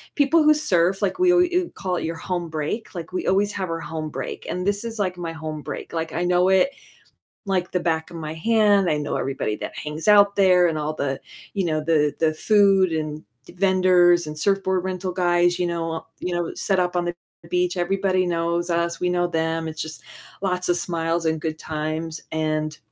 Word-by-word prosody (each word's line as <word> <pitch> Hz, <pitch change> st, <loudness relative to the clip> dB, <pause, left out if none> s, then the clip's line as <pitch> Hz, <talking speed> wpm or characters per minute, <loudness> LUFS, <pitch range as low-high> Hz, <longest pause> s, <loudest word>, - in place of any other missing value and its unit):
people 305 Hz, +2 st, +4 dB
who 305 Hz, 0 st, +6 dB
surf, 190 Hz, -, +1 dB
like 200 Hz, -, -1 dB
we 365 Hz, -1 st, +5 dB
alw 360 Hz, 0 st, +2 dB
call 180 Hz, -2 st, -2 dB
it -, -, -3 dB
your 165 Hz, 0 st, -3 dB
home 175 Hz, 0 st, -3 dB
break, 160 Hz, +8 st, -4 dB
like 170 Hz, 0 st, -6 dB
we 185 Hz, -, -2 dB
always 200 Hz, +2 st, +2 dB
have 185 Hz, -3 st, -3 dB
our 165 Hz, 0 st, -2 dB
home 155 Hz, -1 st, -5 dB
break, 130 Hz, -2 st, -6 dB
and 180 Hz, +1 st, -3 dB
this 205 Hz, +2 st, 0 dB
is 225 Hz, -2 st, -6 dB
like 185 Hz, -2 st, -1 dB
my 170 Hz, -2 st, -4 dB
home 155 Hz, -1 st, -6 dB
break, 145 Hz, -, -7 dB
like 165 Hz, -1 st, -3 dB
I 175 Hz, -, -1 dB
know 180 Hz, +1 st, +3 dB
it 190 Hz, +8 st, +4 dB, 0.7 s
like 185 Hz, -2 st, -1 dB
the 180 Hz, -, +1 dB
back 160 Hz, -1 st, -1 dB
of 170 Hz, -, -9 dB
my 155 Hz, -1 st, -5 dB
hand, 205 Hz, 0 st, +3 dB
I 150 Hz, -, +2 dB
know 145 Hz, -1 st, -2 dB
everybody 135 Hz, -6 st, -2 dB
that -, -, -7 dB
hangs 155 Hz, +5 st, -5 dB
out 200 Hz, -1 st, +6 dB
there, 180 Hz, -2 st, +5 dB
and 155 Hz, -1 st, -1 dB
all 150 Hz, +1 st, -2 dB
the 135 Hz, -2 st, -2 dB, 0.3 s
you 195 Hz, -2 st, 0 dB
know, 155 Hz, -1 st, 0 dB
the 150 Hz, -2 st, +2 dB
the 160 Hz, -1 st, +3 dB
food, 195 Hz, -1 st, +4 dB
and 155 Hz, -1 st, -3 dB, 0.3 s
vendors, 180 Hz, -2 st, +4 dB
and 150 Hz, 0 st, -6 dB
surfboard 190 Hz, 0 st, +1 dB
rental 185 Hz, 0 st, -3 dB
guys, 175 Hz, -1 st, +2 dB
you 180 Hz, -, +1 dB
know, 165 Hz, -1 st, -3 dB
u 180 Hz, -, -3 dB
you 175 Hz, -, -2 dB
know, 175 Hz, -1 st, -2 dB
set 195 Hz, -2 st, 0 dB
up 180 Hz, 0 st, +1 dB
on 175 Hz, -, +1 dB
the 175 Hz, -, -2 dB, 0.4 s
beach, 180 Hz, 0 st, +1 dB
everybody 185 Hz, +1 st, +1 dB
knows 170 Hz, 0 st, -1 dB
us, 170 Hz, 0 st, 0 dB
we 180 Hz, -, +1 dB
know 175 Hz, 0 st, +1 dB
them, 160 Hz, -1 st, -1 dB
it's 155 Hz, -1 st, -6 dB
just 155 Hz, -5 st, -8 dB, 0.4 s
lots 180 Hz, -2 st, -1 dB
of 175 Hz, -, +3 dB
smiles 165 Hz, -1 st, -1 dB
and 160 Hz, -1 st, 0 dB
good 155 Hz, -1 st, -3 dB
times, 155 Hz, +1 st, -4 dB
and 155 Hz, -1 st, -1 dB
175 Hz, 210 wpm, -23 LUFS, 160-190 Hz, 0.7 s, who